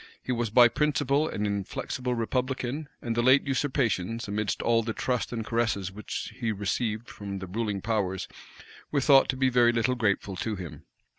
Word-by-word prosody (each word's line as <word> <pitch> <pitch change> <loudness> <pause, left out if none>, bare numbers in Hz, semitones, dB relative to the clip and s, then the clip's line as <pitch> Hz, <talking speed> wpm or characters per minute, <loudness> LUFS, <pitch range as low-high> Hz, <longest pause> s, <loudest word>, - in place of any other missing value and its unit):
He - - -3
was 120 -2 0
by 120 +3 +7
principle 145 +2 +1
an 105 - -2
inflexible 105 +5 -2
republican; 130 +4 -2
and 115 -1 -2
the 120 - +2
late 130 +3 +5
usurpations, 120 -6 0
amidst 105 0 -2
all 115 0 +3
the 110 0 -3
trust 125 +1 -1
and 115 -2 -3
caresses 110 -5 0
which 105 +2 -6
he 115 -3 0
received 110 +2 -2
from 100 -1 -6
the 95 - -6
ruling 100 +1 -2
powers, 100 -4 -1 0.6
were 145 - +1
thought 135 0 +5
to 130 - 0
be 130 0 +3
very 120 -1 +5
little 120 +2 +1
grateful 100 -5 0
to 110 +3 -2
him. 90 -4 -8
115 Hz, 175 wpm, -28 LUFS, 105-130 Hz, 0.6 s, by